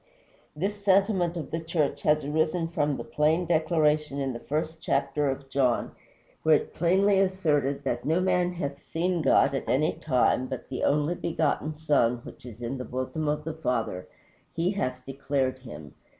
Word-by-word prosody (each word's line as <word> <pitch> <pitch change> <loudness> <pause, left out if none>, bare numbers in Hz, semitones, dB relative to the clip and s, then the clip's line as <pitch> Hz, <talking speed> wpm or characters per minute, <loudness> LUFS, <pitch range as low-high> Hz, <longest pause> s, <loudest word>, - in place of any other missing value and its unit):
This 200 +6 -3
sentiment 190 -3 +2
of 160 - -6
the 165 - -1
church 160 -3 -1
has 150 -1 +2
arisen 160 +3 0
from 145 -4 0
the - - -5
plain 155 +4 +1
declaration 155 -3 +1
in 135 -2 -1
the 120 - -6
first 160 +4 -3
chapter 145 -2 0
of 135 0 -4
John, 130 -3 +1 0.5
where 160 -1 +5
it - - +2
is - - -15
plainly 190 +4 +3
asserted 150 -8 +1
that 120 -3 -2
"no 160 +4 +1
man 180 -1 +1
hath 140 -5 -4
seen 175 +1 -1
God 135 -1 +4
at 135 - -3
any 150 +4 +2
time, 130 -2 +1
but 130 -2 -6
the 130 - -4
only 150 +3 +2
begotten 160 -2 -1
Son, 145 -6 +2
which 130 - -11
is 120 0 -10
in 130 +3 -3
the - - -3
bosom 130 +5 -3
of 150 +1 -1
the 160 +1 -4
Father, 115 -11 -2 0.5
he 170 +3 +1
hath 130 -11 -3
declared 135 -1 -1
him." 75 - -10
150 Hz, 180 wpm, -27 LUFS, 135-165 Hz, 0.5 s, where